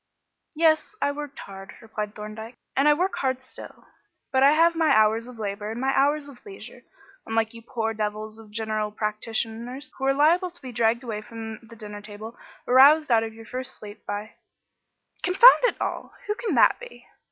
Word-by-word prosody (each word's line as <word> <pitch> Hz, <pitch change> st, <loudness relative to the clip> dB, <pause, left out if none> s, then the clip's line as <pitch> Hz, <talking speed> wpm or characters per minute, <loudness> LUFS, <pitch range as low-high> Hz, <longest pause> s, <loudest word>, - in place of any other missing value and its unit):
"Yes, 320 Hz, +5 st, +2 dB
I 285 Hz, -, +1 dB
worked 290 Hz, -1 st, -7 dB
hard," 195 Hz, 0 st, -10 dB
replied 215 Hz, -2 st, -6 dB
Thorndyke, 220 Hz, +2 st, -8 dB, 0.2 s
"and 275 Hz, +2 st, +3 dB
I 300 Hz, -, +7 dB
work 365 Hz, +5 st, -1 dB
hard 260 Hz, -1 st, -1 dB
still; 260 Hz, -, -12 dB, 0.5 s
but 260 Hz, -, +2 dB
I 280 Hz, +2 st, +7 dB
have 335 Hz, +2 st, +4 dB
my 325 Hz, -2 st, +2 dB
hours 220 Hz, +2 st, +3 dB
of 250 Hz, -2 st, -11 dB
labour 205 Hz, 0 st, -4 dB
and 225 Hz, +2 st, -5 dB
my 265 Hz, +1 st, +1 dB
hours 290 Hz, +1 st, +2 dB
of 270 Hz, -4 st, -14 dB
leisure, 400 Hz, -1 st, -11 dB, 0.5 s
unlike 225 Hz, 0 st, 0 dB
you 230 Hz, -, -11 dB
poor 225 Hz, -1 st, -3 dB
devils 215 Hz, +1 st, -4 dB
of 220 Hz, -1 st, -14 dB
general 215 Hz, 0 st, -2 dB
practitioners, 225 Hz, +5 st, -4 dB
who 265 Hz, -, -2 dB
are 270 Hz, -, +3 dB
liable 340 Hz, +6 st, +3 dB
to 350 Hz, 0 st, -14 dB
be 255 Hz, -, -7 dB
dragged 235 Hz, +1 st, +1 dB
away 220 Hz, -4 st, -4 dB
from 225 Hz, -1 st, -8 dB
the 230 Hz, 0 st, -15 dB
dinner 210 Hz, -1 st, -8 dB
table 215 Hz, +2 st, -10 dB, 0.3 s
or 245 Hz, -, -1 dB
roused 290 Hz, +2 st, +7 dB
out 225 Hz, -1 st, +5 dB
of 225 Hz, 0 st, -5 dB
your 225 Hz, 0 st, -12 dB
first 255 Hz, +2 st, -5 dB
sleep 205 Hz, 0 st, -11 dB
by 205 Hz, +1 st, -4 dB, 0.9 s
confound 385 Hz, +8 st, +7 dB
it -, -, 0 dB
all! -, -, -4 dB
who 420 Hz, -, -1 dB
can 460 Hz, +1 st, -3 dB
that -, -, +5 dB
be?" -, -, -12 dB
230 Hz, 195 wpm, -25 LUFS, 215-285 Hz, 0.9 s, I